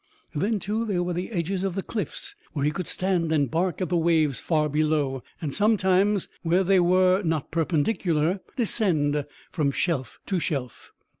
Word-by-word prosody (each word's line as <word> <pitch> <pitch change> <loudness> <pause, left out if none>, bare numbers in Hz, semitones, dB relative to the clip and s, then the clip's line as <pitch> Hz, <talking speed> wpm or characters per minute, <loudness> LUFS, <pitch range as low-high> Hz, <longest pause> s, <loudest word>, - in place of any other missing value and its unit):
Then, 205 +8 0
too, 210 +5 -2
there 195 -6 0
were 175 0 -2
the 180 +2 -3
edges 185 -1 -2
of 190 -2 -1
the 195 - -2
cliffs 235 - -5 0.2
where 145 -2 -1
he 150 - +2
could 180 +1 -4
stand 180 -4 0
and 145 -6 +1
bark 180 +3 0
at 180 - -3
the 175 - +2
waves 160 -4 +2
far 155 -3 +1
below, 150 -3 0 0.2
and 150 -6 -4
sometimes, 200 -2 +2
where 175 +3 +2
they 190 0 +4
were 185 +2 +4
not 160 -6 -2
perpendicular, 165 +1 +1 0.2
descend 160 - +1 0.2
from 150 -5 +1
shelf 140 -2 -2
to 190 -3 0
shelf. 140 -7 -4
175 Hz, 170 wpm, -25 LUFS, 155-190 Hz, 0.2 s, they